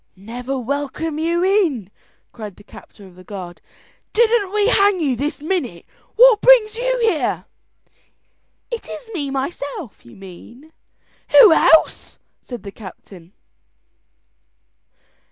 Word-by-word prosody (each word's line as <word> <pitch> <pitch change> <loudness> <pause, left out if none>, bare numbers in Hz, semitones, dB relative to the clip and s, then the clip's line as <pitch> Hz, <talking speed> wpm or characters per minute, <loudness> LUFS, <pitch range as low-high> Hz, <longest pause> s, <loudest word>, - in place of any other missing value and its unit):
"Never 245 +7 -6
welcome 285 +4 -4
you 340 +2 0
in," 340 - 0 0.4
cried 210 -5 -9
the 205 - -17
captain 205 -1 -15
of 185 - -16
the 185 +1 -16
guard, 185 -3 -9 0.5
"didn't 445 -3 +2
we 415 0 +1
hang 400 -4 +3
you 280 -6 0
this 285 +4 -4
minute, 290 - -3
and - - -35
what 475 -2 +6
brings 465 -4 +5
you - - -1
here?" 395 -10 0 1.3
"Is 470 - -3
it 455 -2 -10
me 290 -7 -3
myself, 275 - -6
you 120 - -16
mean?" 230 - -14 0.7
"Who 440 -9 +9
else?" 320 0 +3 0.2
said 245 -3 -9
the 200 - -8
captain. 190 -3 -14
290 Hz, 125 wpm, -19 LUFS, -, 1.3 s, Who